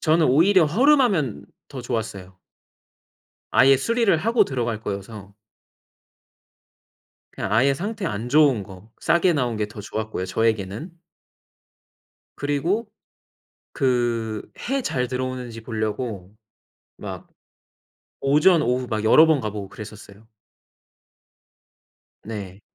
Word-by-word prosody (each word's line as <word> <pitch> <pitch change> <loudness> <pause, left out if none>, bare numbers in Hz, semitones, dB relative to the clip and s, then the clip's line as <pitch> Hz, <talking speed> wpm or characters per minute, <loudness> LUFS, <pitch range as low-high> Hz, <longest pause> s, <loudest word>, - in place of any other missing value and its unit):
저는 160 0 +3
오히려 170 +6 +5
허름하면 210 - +2 0.2
더 135 -3 -7
좋았어요. 100 -6 -5 1.1
아예 135 +1 +6
수리를 230 - +2
하고 220 +4 +3
들어갈 120 -6 -3
거여서 100 -1 -7 2.0
그냥 95 - -4
아예 135 +5 +4
상태 205 +4 -4
안 110 +1 -4
좋은 140 -6 +4
거 95 +3 -13
싸게 170 +1 +3
나온 125 -7 -1
게 105 - -1
더 105 0 -10
좋았고요 105 -2 -4
저에게는. 110 - -1 1.5
그리고 160 - -1 0.9
그 120 -5 0 0.3
해 275 0 +1
잘 125 - -1
들어오는지 125 -2 -5
보려고 110 -3 -4 0.6
막 - - -8 0.9
오전, 150 +5 +4
오후 125 -1 0
막 110 -2 -2
여러 155 +8 +7
번 160 -3 +3
가 110 - -3
보고 100 -2 -7
그랬었어요. 105 0 -12 2.0
네. 100 -3 -7
125 Hz, 220 characters per minute, -23 LUFS, 110-155 Hz, 2.0 s, 여러